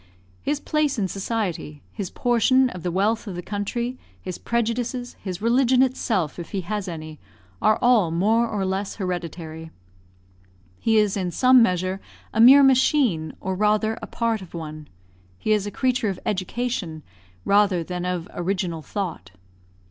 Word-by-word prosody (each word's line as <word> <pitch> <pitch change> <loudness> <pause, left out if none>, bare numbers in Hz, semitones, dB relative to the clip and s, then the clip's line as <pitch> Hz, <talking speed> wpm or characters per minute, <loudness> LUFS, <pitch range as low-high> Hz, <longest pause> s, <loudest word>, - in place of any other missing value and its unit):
His 290 0 -1
place 300 -2 0
in 200 -3 0
society 190 -7 -3
his 200 -5 -4
portion 250 +2 +3
of 180 - -8
the 180 - -2
wealth 210 +6 0
of 190 - -5
the 175 - -5
country 235 +6 -3 0.2
his 185 -2 -6
prejudices 235 +1 -2
his 185 0 -5
religion 255 +2 +4
itself, 215 - -1
if 170 - -8
he 195 - -1
has 205 +2 -4
any, 155 -3 -7 0.4
are 215 - +4
all 235 -8 +4
more 215 +8 +2
or 205 -3 -2
less 190 +1 -2
hereditary. 165 -4 -5 1.1
He 225 -1 +2
is 210 -2 +3
in 185 -3 -1
some 255 +7 +5
measure 185 -2 +1 0.3
a - - -1
mere 270 +4 +9
machine, 255 - +3
or 190 - -3
rather 215 +3 +1
a - - -6
part 230 -2 -1
of 180 -2 -11
one. 155 -2 -7 0.5
He 215 - -2
is 210 -1 +2
a - - -2
creature 250 -1 0
of 190 - -4
education, 190 -5 -3 0.4
rather 200 -4 +3
than 180 +1 -5
of 180 -2 -2
original 175 -2 -2
thought. 170 - -5
200 Hz, 155 wpm, -23 LUFS, 180-235 Hz, 1.1 s, mere